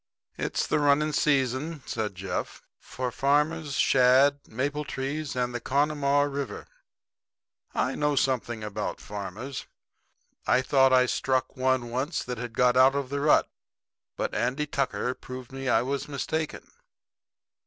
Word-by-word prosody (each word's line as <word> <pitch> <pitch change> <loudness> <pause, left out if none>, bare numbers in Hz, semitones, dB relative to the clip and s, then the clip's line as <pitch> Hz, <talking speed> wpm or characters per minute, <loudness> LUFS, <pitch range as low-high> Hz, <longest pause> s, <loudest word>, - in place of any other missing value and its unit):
"It's - - -1
the - - +1
running 150 +1 +3
season," 140 +1 0
said 105 -3 -3
Jeff, 95 +1 -4 0.2
"for 125 -1 -4
farmers, 145 +3 +1
shad, 135 +3 +4
maple 140 +6 -2
trees 140 +1 -4
and 125 -1 -1
the 120 - -4
Connemaugh 145 0 +2
river. 140 -1 -4 1.1
I 130 - +1
know 150 -1 0
something 120 -4 0
about 105 -1 -4
farmers. 105 +6 -6 0.8
I 130 - +4
thought 135 -1 +4
I 130 -1 +5
struck 130 0 0
one 130 -2 0
once 135 +7 -2
that 125 -2 -5
had 120 -1 -5
got 125 +1 +3
out 130 +2 +6
of 140 -2 -2
the 140 +1 -2
rut; 150 +1 +4 0.7
but - - -2
Andy 145 +4 0
Tucker 135 -3 -1
proved 130 -1 -9
to - - -10
me 135 -1 -3
I 110 - +3
was 135 +2 -3
mistaken. 155 +2 -3
135 Hz, 145 wpm, -27 LUFS, 125-145 Hz, 1.1 s, out